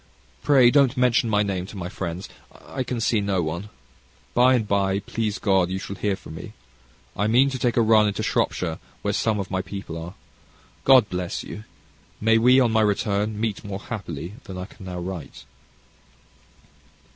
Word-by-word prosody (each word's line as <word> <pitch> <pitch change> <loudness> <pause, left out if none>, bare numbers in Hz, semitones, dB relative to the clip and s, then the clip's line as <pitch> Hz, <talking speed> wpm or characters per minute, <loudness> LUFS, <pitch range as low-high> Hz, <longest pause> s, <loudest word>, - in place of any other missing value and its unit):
Pray 130 -4 +5
don't 140 -2 +4
mention 125 -2 +3
my 105 -1 +3
name 95 -2 -3
to 100 - -10
my 90 -2 -4
friends. 90 -1 -5 0.3
I 135 - -6
can 125 -1 -3
see 115 -1 +1
no 100 -3 0
one. 85 +6 -4 0.6
By 125 +1 +5
and 110 -4 0
by, 100 -1 +1
please 105 +1 -2
God, 95 -4 +2
you 95 - -2
shall 100 +1 -6
hear 100 +1 -1
from 80 - -11
me. 80 - -9 0.6
I 105 - 0
mean 130 +5 +4
to 130 - -4
take 120 -1 0
a 115 - +5
run 110 -1 +5
into 100 - -2
Shropshire, 80 -3 -1 0.2
where - - 0
some 110 -2 0
of 95 -1 -5
my 95 -1 0
people 95 -3 -7
are. 90 +3 -9 0.7
God 130 -5 +7
bless 90 -1 -3
you! 105 - -8 0.5
May 115 +1 +4
we, 125 +3 +6
on 120 -3 +3
my 110 0 +3
return, 105 0 0
meet 110 -2 -2
more 100 -1 -5
happily 90 -5 -6
than 95 - -7
I 90 - -5
can 95 -1 -13
now 90 -1 -5
write. 90 -4 -7
105 Hz, 185 wpm, -24 LUFS, 95-115 Hz, 0.7 s, God